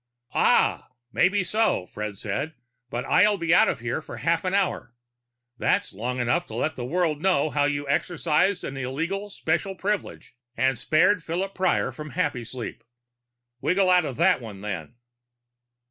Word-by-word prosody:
"Ah! - - +3 0.2
Maybe 190 +6 +3
so," 215 - +1
Fred 105 +1 -6
said. 140 +11 -3 0.3
"But 120 0 -3
I'll 205 +6 +4
be 170 -2 +1
out - - +6
of - - -1
here 120 +5 -2
for - - -9
half 165 0 +1
an 185 +1 0
hour. 185 -11 -1 0.6
That's - - +1
long 125 +6 -3
enough 125 +9 +1
to - - -8
let 155 - -1
the 125 - -5
world 155 +2 0
know 160 -5 +2
how 145 -1 +2
you 145 0 -1
exercised 175 +5 +1
an 135 - -5
illegal 165 +11 -3
special 195 -1 -1
privilege 200 -7 -3 0.2
and 130 -1 +1
spared 180 +4 +3
Philip 185 +4 -3
Prior 185 -1 +1
from 150 -3 -9
Happysleep. 120 -1 -3 0.8
Wiggle 185 0 +3
out 180 -2 +5
of 130 - -4
that - - +3
one, 105 -4 -9
then." 95 -1 -5
155 Hz, 160 wpm, -25 LUFS, 125-185 Hz, 0.8 s, out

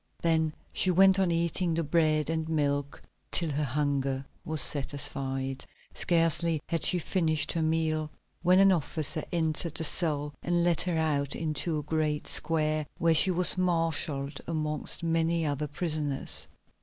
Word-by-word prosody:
Then 160 -2 +1 0.2
she 185 - +1
went 190 +2 +4
on 190 -2 +1
eating 170 0 -1
the 165 - -1
bread 155 0 +1
and 160 -1 -3
milk 145 -2 -2 0.3
till 165 -3 0
her 145 +2 -2
hunger 140 -1 -2 0.2
was 155 0 +3
satisfied. 135 -2 +2 0.3
Scarcely 165 -1 +1
had 165 -2 -2
she 180 - +4
finished 160 -3 0
her 165 - -2
meal, 155 -1 -1 0.3
when 180 +2 +3
an 195 0 +5
officer 155 -2 -1
entered 160 -1 -1
the 160 - +1
cell 150 -2 +1
and 175 0 0
led 170 -2 +1
her 175 -2 -2
out 145 -3 -1
into 155 0 -1
a 150 - -4
great 150 -1 -2
square, 155 -2 +1
where 165 0 +2
she 160 +4 +5
was 180 0 +4
marshalled 160 -5 -1
amongst 155 0 -1
many 165 0 0
other 145 0 -3
prisoners. 150 -2 -1
160 Hz, 150 wpm, -28 LUFS, 150-170 Hz, 0.3 s, an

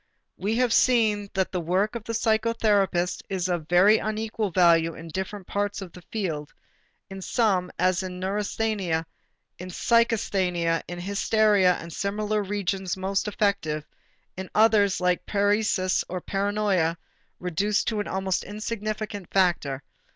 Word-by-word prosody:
We 210 +3 -1
have 245 -1 +2
seen 215 -5 +3
that 190 -1 0
the 180 - -2
work 185 +6 0
of 235 -3 -6
the 230 - -4
psychotherapist 220 -5 +1
is 185 -2 -1
of 175 -4 -2
very 195 +5 +6
unequal 215 0 -2
value 165 -2 +4
in 165 0 -9
different 190 +3 -5
parts 205 +2 -2
of 190 -3 -8
the 180 - -13
field; 160 -9 -3 0.6
in 195 0 -7
some, 190 -4 +1
as 185 0 +2
in 180 -1 -6
neurasthenia, 200 -3 -1 0.5
in 180 +1 -7
psychasthenia, 185 -6 +1
in 175 0 -6
hysteria 200 0 +3
and 165 0 -8
similar 210 +3 -1
regions 195 -2 -2
most 195 +2 -1
effective, 200 -8 0 0.5
in 190 0 -6
others 210 -3 +4
like 180 -1 0
paresis 205 -2 +1
or 185 - -3
paranoia 195 -4 0 0.4
reduced 195 +4 0
to 220 -2 -2
an 205 - -2
almost 190 -1 -1
insignificant 215 -2 -5
factor. 165 -8 +1
195 Hz, 135 wpm, -25 LUFS, 180-210 Hz, 0.6 s, very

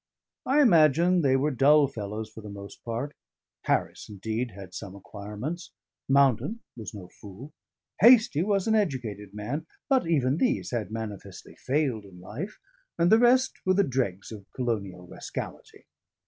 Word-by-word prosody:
I 290 +3 +5
imagine 170 - +5
they 135 -3 +3
were 145 +3 +1
dull 145 +3 +5
fellows 110 -3 -5
for 110 - -12
the 105 - -9
most 100 0 -10
part. 120 +5 -4 0.5
Harris, - - -1
indeed, 110 +4 -3
had 95 -3 -11
some 100 -1 -7
acquirements, 105 - -7 0.4
Mountain 140 - +3
was 110 -3 -7
no 95 -3 -9
fool, 105 - -12 0.5
Hastie 225 - +6
was 195 0 +1
an 220 - +3
educated 120 - -2
man; 135 +10 -4 0.2
but 265 -10 +3
even 140 -4 +2
these 260 +7 0
had 115 -4 -2
manifestly 110 -3 -7
failed 130 -6 -1
in 90 -2 -14
life, 130 - -7 0.4
and 170 +1 +3
the 220 - +7
rest 255 +2 +3
were 185 0 +2
the 200 - +4
dregs 120 - -2
of 105 -3 -10
colonial 100 -8 -3
rascality. - - -8
130 Hz, 150 wpm, -27 LUFS, 105-170 Hz, 0.5 s, the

